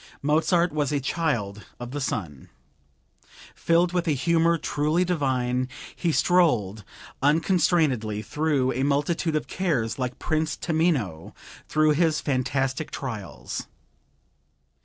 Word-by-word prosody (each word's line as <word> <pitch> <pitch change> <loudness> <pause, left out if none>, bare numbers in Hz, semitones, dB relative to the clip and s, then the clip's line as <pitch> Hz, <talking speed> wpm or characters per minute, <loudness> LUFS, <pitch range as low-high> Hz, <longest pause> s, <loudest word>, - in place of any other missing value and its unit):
Mozart 160 +3 +2
was 150 -2 0
a 145 - +1
Child 120 -9 -2 0.2
of 120 0 -7
the 145 +1 -4
Sun. 80 - -4 1.0
Filled 170 +1 +2
with 180 -1 0
a 155 - +3
humor 165 +4 +2
truly 155 +3 0
divine, 130 -7 0 0.3
he 170 - 0
strolled 120 - +2 0.4
unconstrainedly 150 - +2
through 145 -3 0
a 130 - -2
multitude 145 +4 0
of 155 - -1
cares 140 -12 -1
like 125 -1 -3
Prince 155 0 -1
Tamino 150 - -1 0.3
through 155 0 +3
his 155 0 +2
fantastic 135 +1 -1
trials. 115 -9 -6
145 Hz, 115 wpm, -25 LUFS, 125-165 Hz, 1.0 s, a